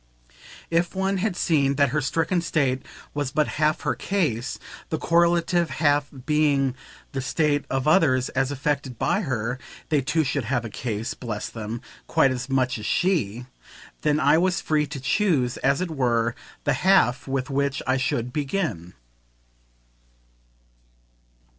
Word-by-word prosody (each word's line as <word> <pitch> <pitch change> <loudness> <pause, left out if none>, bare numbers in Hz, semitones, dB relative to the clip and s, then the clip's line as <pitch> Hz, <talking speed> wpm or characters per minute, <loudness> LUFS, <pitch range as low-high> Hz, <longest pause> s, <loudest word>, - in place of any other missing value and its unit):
If 170 +2 +1
one 195 +1 0
had 195 0 -1
seen 140 -6 +2
that 140 -1 +3
her 150 +3 0
stricken 165 +5 0
state 135 -6 0 0.3
was 145 -2 -1
but 150 +3 +1
half 155 +1 +2
her - - 0
case, 150 - -1 0.3
the 160 - -1
correlative 170 +1 +2
half 145 -2 +2 0.2
being 145 -4 +2 0.4
the 135 - -3
state 145 +2 +1
of 135 +1 -1
others 135 -7 +4
as 135 0 0
affected 140 -2 -2
by 200 - +1
her 125 - -2 0.3
(they 150 -3 +3
too 155 +4 +1
should 135 -2 -1
have 120 0 -1
a 110 - -6
"case," 110 0 -3
bless 110 -4 -5
them, 110 +1 -6 0.3
quite 135 - +3
as 130 +1 -4
much 130 -3 +1
as 105 - -7
she!) 125 - 0 0.6
then 150 0 +2
I 155 - +4
was 180 0 +1
free 150 -1 +1
to 140 0 -6
choose, 135 - +1
as 140 +5 +1
it 180 -3 -2
were, 120 -5 +1 0.3
the 145 - +2
half 180 -11 +3
with 135 0 -2
which 140 0 0
I 130 +1 +2
should 125 -1 -1
begin. 140 - -2
140 Hz, 150 wpm, -24 LUFS, 125-160 Hz, 0.6 s, others